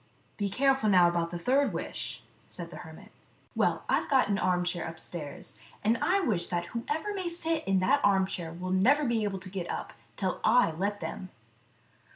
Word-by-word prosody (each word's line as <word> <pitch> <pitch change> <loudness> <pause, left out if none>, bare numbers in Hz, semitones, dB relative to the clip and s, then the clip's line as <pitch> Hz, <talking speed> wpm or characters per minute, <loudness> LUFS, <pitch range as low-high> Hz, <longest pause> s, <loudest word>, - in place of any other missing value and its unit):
Be 205 -1 -1
careful 270 +1 +2
now 180 -3 +6
about 170 -1 0
the 175 - -4
third 265 +10 +2
wish," - - -5 0.3
said - - -7
the - - -8
hermit. - - -11 0.2
" - - -35
Well, - - +1
I - - +3
have - - -8
got 265 -6 +4
an 200 0 +1
armchair 180 -2 0
upstairs, 160 -8 -7 0.2
and 220 +2 +3
I 390 +2 +3
wish 195 - 0
that 175 -1 -2
whoever 305 - -2
may 375 -3 -2
sit 330 -1 -2
in 195 0 +3
that 185 - +3
armchair 190 -4 +1
will 180 +2 -5
never 260 +11 +4
be 235 -3 +1
able 200 -2 -2
to 185 0 -8
get 185 -3 -4
up - - -4 0.2
till 190 -2 -2
I 240 -5 +5
let 200 +5 -2
them." 185 - -5
195 Hz, 195 wpm, -29 LUFS, 175-260 Hz, 0.3 s, now